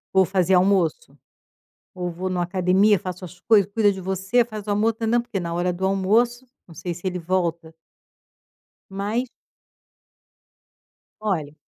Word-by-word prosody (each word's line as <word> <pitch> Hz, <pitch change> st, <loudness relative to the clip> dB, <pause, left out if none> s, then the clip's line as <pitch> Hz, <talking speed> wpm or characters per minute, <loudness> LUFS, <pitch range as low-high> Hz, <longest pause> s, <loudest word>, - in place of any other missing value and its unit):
Vou 190 Hz, 0 st, +5 dB
fazer 190 Hz, 0 st, +2 dB
almoço. 190 Hz, -, +1 dB, 0.8 s
Ou 180 Hz, -1 st, -4 dB
vou 180 Hz, +3 st, -4 dB
em -, -, -2 dB
uma 175 Hz, -1 st, 0 dB
academia, 185 Hz, +3 st, +3 dB
faço 185 Hz, +1 st, -7 dB
as 180 Hz, +1 st, -13 dB
coisas, 205 Hz, -4 st, +4 dB
cuida 210 Hz, -2 st, +4 dB
de 190 Hz, -, -6 dB
você, 190 Hz, +6 st, +1 dB
faz 215 Hz, -3 st, -8 dB
o -, -, -3 dB
almoço, 210 Hz, +3 st, +2 dB
tãnã, 225 Hz, +1 st, +1 dB
porque, 235 Hz, -4 st, -4 dB
na 170 Hz, -1 st, -4 dB
hora 175 Hz, +1 st, 0 dB
do 185 Hz, +2 st, -3 dB
almoço, 220 Hz, +6 st, +1 dB, 0.2 s
não 165 Hz, -, -14 dB
sei 175 Hz, +1 st, -4 dB
se 175 Hz, +3 st, -12 dB
ele 180 Hz, -1 st, -2 dB
volta. 170 Hz, -2 st, -2 dB, 1.2 s
Mas 210 Hz, +6 st, -2 dB, 1.9 s
Olha 165 Hz, -9 st, -2 dB
190 Hz, 155 wpm, -23 LUFS, 180-210 Hz, 1.9 s, Vou